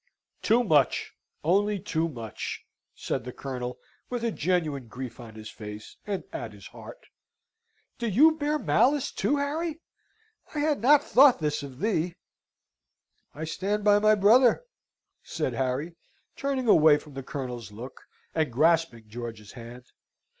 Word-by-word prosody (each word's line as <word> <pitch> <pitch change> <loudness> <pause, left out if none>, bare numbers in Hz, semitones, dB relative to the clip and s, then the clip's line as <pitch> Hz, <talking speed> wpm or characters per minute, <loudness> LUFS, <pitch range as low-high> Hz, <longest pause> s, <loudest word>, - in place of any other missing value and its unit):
"Too 235 +3 +3
much, 150 - +2 0.3
only 200 +6 +2
too 165 -1 -1
much," 115 -7 -6 0.3
said 130 - -3
the 125 - -6
Colonel, 125 -2 -5 0.3
with 245 -2 -3
a 230 - +1
genuine 155 - -1
grief 120 +1 -8
on 115 -3 -11
his 110 0 -9
face, 105 -1 -9
and 200 -2 -2
at - - -5
his - - -14
heart. - - -12 0.9
"Do 235 - -1
you 285 - +6
bear 305 -1 -1
malice 280 0 +2
too, 290 - 0
Harry? 310 +3 -2 0.8
I - - -1
had 295 -5 +1
not 290 +4 +6
thought 265 0 +6
this 150 -2 -1
of 135 -3 -9
thee!" 175 -3 -1 1.2
"I 155 - -6
stand 200 +6 -2
by 205 0 +5
my 215 +1 +5
brother," 235 - +5 0.6
said - - -3
Harry, 135 +6 -2 0.4
turning 270 -3 -2
away 155 -7 +6
from 150 -1 -13
the 135 - -5
Colonel's 125 -5 -6
look, 120 +5 -10 0.3
and 155 -5 0
grasping 155 -4 +2
George's 110 -2 -8
hand. 120 0 -11
160 Hz, 145 wpm, -27 LUFS, -, 1.2 s, you